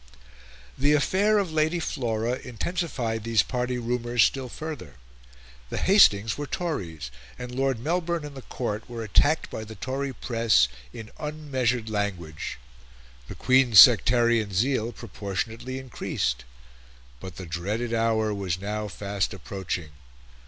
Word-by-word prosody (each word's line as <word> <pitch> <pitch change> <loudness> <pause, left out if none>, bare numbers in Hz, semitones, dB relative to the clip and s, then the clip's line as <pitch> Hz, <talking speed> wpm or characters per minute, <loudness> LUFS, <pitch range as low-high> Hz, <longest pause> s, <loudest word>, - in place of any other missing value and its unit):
The 145 +2 +4
affair 195 +8 +3
of 195 -5 0
Lady 160 +2 +1
Flora 120 -5 -2
intensified 125 - -3
these 115 -3 +3
party 125 0 -2
rumours 120 0 +1
still 130 -2 0
further. 150 - -7 0.7
The - - -4
Hastings 115 - +5
were 145 - -3
Tories, 85 - -4 0.3
and 125 0 -7
Lord 135 -1 0
Melbourne 170 +4 -1
and 145 -1 -9
the 135 - -8
Court 110 -4 -4
were 115 -1 -5
attacked 145 +9 +2
by 110 - -5
the 110 0 -9
Tory 135 +6 -3
press 115 - +2 0.2
in 110 - -9
unmeasured 130 -6 -1
language. 100 -8 -3 0.7
The - - -8
Queen's 130 -5 +5
sectarian 115 -2 +6
zeal 120 +2 +1
proportionately 115 +3 -5
increased. 65 - -3 0.7
But 90 +6 -9
the 95 - -7
dreaded 100 +8 -3
hour 110 -2 +1
was 95 -3 -2
now 105 +2 -3
fast 100 0 -3
approaching. 95 -4 -5
115 Hz, 130 wpm, -26 LUFS, 105-135 Hz, 0.7 s, sectarian